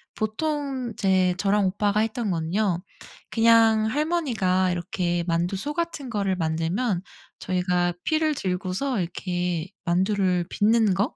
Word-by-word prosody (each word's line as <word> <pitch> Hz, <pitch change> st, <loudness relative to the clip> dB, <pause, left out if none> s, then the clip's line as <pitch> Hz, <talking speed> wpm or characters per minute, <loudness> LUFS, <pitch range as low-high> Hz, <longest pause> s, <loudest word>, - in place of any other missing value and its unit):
보통 265 Hz, +2 st, -2 dB
이제 185 Hz, -2 st, +2 dB
저랑 205 Hz, +1 st, +2 dB
오빠가 205 Hz, +2 st, +1 dB
했던 225 Hz, 0 st, -1 dB
거는요 175 Hz, +2 st, 0 dB, 0.5 s
그냥 225 Hz, -1 st, +5 dB
할머니가 225 Hz, -, +1 dB
이렇게 175 Hz, 0 st, -1 dB
만두소 180 Hz, -, -1 dB
같은 335 Hz, -6 st, -3 dB
거를 200 Hz, -4 st, 0 dB
만들면 170 Hz, +5 st, -1 dB, 0.4 s
저희가 180 Hz, -1 st, 0 dB
피를 310 Hz, -1 st, +1 dB
들고서 190 Hz, +6 st, -2 dB
이렇게 175 Hz, -1 st, -2 dB, 0.2 s
만두를 185 Hz, 0 st, +1 dB
빚는 220 Hz, -1 st, +3 dB
거 200 Hz, +6 st, -1 dB
195 Hz, 270 characters per minute, -25 LUFS, 180-230 Hz, 0.5 s, 그냥